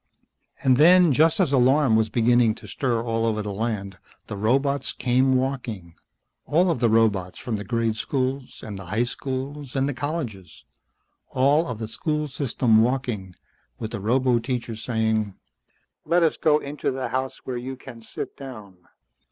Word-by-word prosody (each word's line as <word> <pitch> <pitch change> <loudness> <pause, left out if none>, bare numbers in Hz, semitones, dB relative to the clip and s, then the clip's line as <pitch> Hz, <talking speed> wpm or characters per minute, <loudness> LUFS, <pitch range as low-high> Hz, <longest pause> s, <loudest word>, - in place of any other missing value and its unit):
And 130 -2 +4
then, 175 +2 +7
just 160 +6 +3
as 170 -7 +2
alarm 130 -1 +4
was 110 0 +2
beginning 120 0 +3
to - - -12
stir 120 -4 -1
all 115 -1 -1
over 110 -2 0
the 105 -1 -4
land, 100 -3 -3 0.3
the - - -6
robots 135 +6 +1
came 130 +2 +2
walking, 125 -10 -3 0.5
all 175 +4 +2
of 165 - -2
the 120 - +3
robots 105 -5 +2
from 120 - -3
the 105 - -5
grade 115 +2 0
schools, 130 +2 -3
and 105 -3 -6
the 95 - -9
high 105 +7 0
schools, 135 +2 -5
and 135 0 +1
the 145 - -1
colleges. 130 - -5 0.6
All 140 +5 +2
of 125 - -4
the 110 0 -5
school 150 +7 -2
system 125 -5 +2
walking, 115 -7 -1 0.4
with 110 - -5
the - - -4
roboteachers 120 0 0
saying, 110 -4 0 0.7
"Let 170 +2 +2
us 160 - +2
go 150 -1 +3
into 145 0 -3
the 130 -1 -3
house 130 0 -2
where 125 -2 -4
you 130 +2 -5
can 125 -2 -12
sit - - -7
down." 110 -9 -10
125 Hz, 165 wpm, -24 LUFS, 110-135 Hz, 0.7 s, then